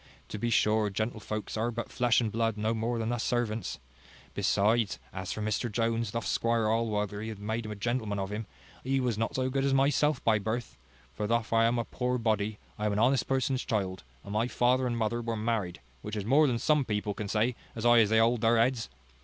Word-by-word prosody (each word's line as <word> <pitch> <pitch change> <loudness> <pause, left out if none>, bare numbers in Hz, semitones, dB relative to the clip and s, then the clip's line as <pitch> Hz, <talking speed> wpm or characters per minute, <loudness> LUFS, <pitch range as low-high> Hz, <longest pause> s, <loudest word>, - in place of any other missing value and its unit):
To 105 - -5
be 120 - 0
sure, 105 -1 +3
gentlefolks 110 +1 -3
are 110 +2 0
but 120 0 -5
flesh 120 -1 +3
and 110 -2 -1
blood 115 0 0
no 110 +2 0
more 115 +2 -1
than 115 0 -1
us 120 - -2
servants. 115 -3 -1 0.6
Besides, 110 +1 +2 0.2
as 95 -1 -4
for 110 - -3
Mr 110 +2 -1
Jones, 115 0 0
thof 115 +2 -3
Squire 115 -1 +1
Allworthy 105 -1 -1
hath 110 - -6
made 110 +2 -3
a 105 - -5
gentleman 110 -1 -2
of 95 0 -3
him, 105 +1 -4 0.4
he 135 +1 +1
was 125 -3 0
not 115 - -1
so 130 0 0
good 135 0 0
as 135 -1 +2
myself 145 +1 +3
by 110 -2 +3
birth: 110 +3 -3 0.4
for 105 +11 -3
thof 115 0 0
I 115 0 +5
am 120 +1 +2
a 115 - -1
poor 125 0 -1
body, 110 -2 0 0.2
I 105 - 0
am 105 - 0
an - - -1
honest 130 +4 +3
person's 130 -1 0
child, 95 -4 -2 0.2
and 100 - -7
my 110 +3 +1
father 125 +1 +2
and 120 -1 -1
mother 115 +1 0
were 115 -1 -2
married, 105 - -2 0.2
which 105 +1 -5
is 105 -2 -3
more 145 +6 +5
than 120 -3 +1
some 150 +4 +2
people 105 -3 -2
can 105 +1 -5
say, 110 +4 +1 0.2
as 110 - -5
high 120 0 +6
as 110 -3 +4
they 110 - +3
hold 115 +1 +3
their 115 +1 +4
heads. 115 - +1
115 Hz, 225 wpm, -29 LUFS, 105-120 Hz, 0.6 s, high